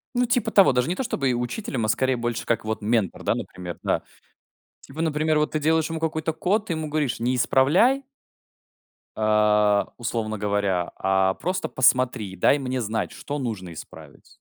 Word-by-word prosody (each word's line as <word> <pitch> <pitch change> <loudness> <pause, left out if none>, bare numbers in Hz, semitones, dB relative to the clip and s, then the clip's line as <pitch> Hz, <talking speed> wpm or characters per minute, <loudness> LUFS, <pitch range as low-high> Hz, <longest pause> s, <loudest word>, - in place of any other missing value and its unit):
Ну, 245 0 +3
типа 235 -1 +1
того, 195 -8 +6
даже 125 +3 +1
не 180 - 0
то, 265 - -2
чтобы 135 - 0
учителем, 120 - -3
а, - - -1
скорее, 130 +3 +1
больше 120 0 -3
как, 115 -2 -1
вот, 110 0 -3
ментор, 105 -3 0
да, - - +1
например, 90 -2 -7
да. - - 0 0.8
Типа, 150 +4 -7
например, 155 -1 +1
вот, 150 - 0
ты 155 - -1
делаешь 160 +1 +1
ему 165 -1 -3
какой-то 160 0 -1
код, 205 +6 0
ты 170 - -1
ему 155 -1 -4
говоришь: 145 -6 -1
"Не 125 +2 0
исправляй" 170 - +3 1.2
"а, 105 -1 +3
условно 110 -2 -3
говоря, 100 -3 -1
а 95 0 +2
просто 185 +1 -2
посмотри 125 -5 +2
и - - -9
дай 140 +10 +3
мне 130 -1 -2
знать, 110 0 -2
что 145 +1 -5
нужно 100 -9 -5
исправить". - - -13
125 Hz, 180 wpm, -24 LUFS, 105-155 Hz, 1.2 s, того